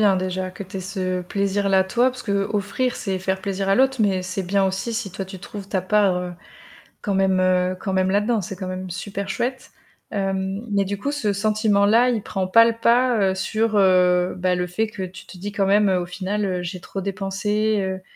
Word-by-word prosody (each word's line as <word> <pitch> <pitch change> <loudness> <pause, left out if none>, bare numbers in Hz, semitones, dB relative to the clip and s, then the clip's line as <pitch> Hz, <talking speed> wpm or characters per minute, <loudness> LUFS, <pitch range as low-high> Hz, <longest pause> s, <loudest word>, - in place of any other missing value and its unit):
Bien 200 -3 +4
déjà 185 0 -2
que 190 +2 -8
tu 190 +1 -7
aies - - -4
ce 185 -1 -3
plaisir-là 195 0 +1
toi, 245 +6 +2
parce 250 -1 -10
qu'offrir, 205 +4 -1
c'est 190 -2 -3
faire 190 0 -1
plaisir 195 -1 -2
à 195 - +4
l'autre, 265 -1 +3
mais 190 -3 +1
c'est 185 +1 -3
bien 195 +2 +1
aussi 190 +5 -2
si 220 -4 -3
toi, 195 0 -4
tu 190 0 -9
trouves 200 +1 -9
ta 190 - 0
part, 195 -1 +2
heu, 180 0 -5 0.7
quand 200 - -2
même, 190 -1 +2
heu, 185 0 +2
quand 190 -3 -2
même 190 0 +2
là-dedans, 210 +2 +1
c'est 190 - -5
quand 185 0 -6
même 185 0 -5
super 195 +2 -5
chouette. 255 +2 -3 0.4
Hem, 195 +1 -2
mais 200 -1 +2
du 200 +1 -3
coup, 280 - -2
ce 240 -8 -1
sentiment-là, 215 +2 +3
il 230 -4 -1
prend 190 -2 -2
pas 230 +5 +6
le 230 - +1
pas, 240 +1 +3
heu, - - -1
sur, 215 +3 0
heu, 180 -2 +4
bah, 180 0 +1
le 180 0 -1
fait 215 +5 -1
que 200 -3 -5
tu 185 0 -9
te 185 - -12
dis: 200 +3 -5
«Quand 200 -2 +1
même 205 +1 +4
au 180 -2 +1
final, 190 +4 -3
heu, 180 -2 -1
j'ai 180 +1 -5
trop 195 - -5
dépensé», 205 +2 -1
heu, 190 0 -3
195 Hz, 220 wpm, -22 LUFS, 185-210 Hz, 0.7 s, pas